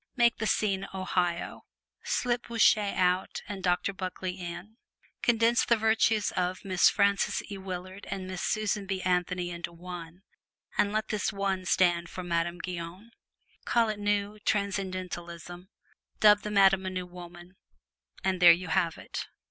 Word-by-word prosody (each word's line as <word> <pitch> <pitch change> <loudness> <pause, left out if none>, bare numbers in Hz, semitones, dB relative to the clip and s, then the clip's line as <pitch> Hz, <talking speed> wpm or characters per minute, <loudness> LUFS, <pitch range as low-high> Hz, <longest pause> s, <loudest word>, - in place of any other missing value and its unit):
Make 235 -2 +3
the 220 - 0
scene 195 -3 0
Ohio: 180 -2 -2 0.4
slip 245 -1 -1
Bossuet 215 -3 +3
out 180 0 +1
and 200 -2 -6
Doctor 180 +2 +1
Buckley 185 -1 -4
in; 180 +4 -8 0.4
condense 235 0 +3
the 235 - +3
virtues 220 -1 +2
of 180 +1 -2
Miss 185 -2 +5
Frances 200 0 +1
E. 200 - -4
Willard 185 +1 -7
and 190 -1 -4
Miss 185 -1 -5
Susan 210 -2 -1
B. 190 -1 -2
Anthony 180 -1 0
into 170 0 -5
one, 175 0 -9 0.5
and 200 - +2
let 215 +1 -1
this 210 -1 -1
one 195 -2 -2
stand 175 -1 +2
for 185 - -6
Madame 170 0 -1
Guyon; 180 +5 -7 0.5
call 230 -2 +2
it 215 -1 -3
New 205 0 -1
Transcendentalism, 185 -3 -3 0.5
dub 210 -1 +6
the 210 - -5
Madame 195 -2 +4
a - - 0
New 185 -1 -4
Woman, 175 0 -12 0.7
and 185 -1 0
there 175 -1 +10
you 170 0 0
have 170 -2 +1
it! - - -6
185 Hz, 150 wpm, -29 LUFS, 180-205 Hz, 0.7 s, there